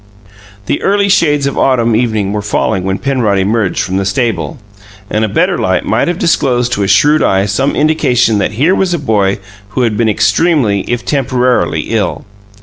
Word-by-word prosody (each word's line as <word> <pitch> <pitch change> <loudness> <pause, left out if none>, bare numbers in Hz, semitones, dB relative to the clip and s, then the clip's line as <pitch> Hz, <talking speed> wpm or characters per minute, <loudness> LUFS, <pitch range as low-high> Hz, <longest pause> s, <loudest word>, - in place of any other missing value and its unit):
The - - -2
early 200 0 +1
shades 145 -7 +2
of 140 - -2
autumn 120 -4 +2
evening 110 -4 -1
were 105 - -2
falling 95 -2 -1
when 95 0 -1
Penrod 125 -7 0
emerged 100 +1 0
from 95 +1 -3
the 100 - 0
stable; 110 - -2 0.5
and 110 - 0
a 110 - 0
better - - 0
light - - 0
might - - 0
have 175 -1 -1
disclosed 125 -8 0
to 105 - -1
a 100 - 0
shrewd 150 +8 +3
eye 95 0 +2
some 105 +8 -1
indications 125 -8 +1
that 100 - -1
here 145 - +2
was 190 -2 0
a - - -2
boy 105 -9 0 0.4
who 130 - +2
had 115 -3 0
been 115 -2 +1
extremely, 110 - +1
if 120 0 -3
temporarily, 130 -3 0
ill. 105 -6 -2
120 Hz, 185 wpm, -12 LUFS, 105-140 Hz, 0.5 s, shrewd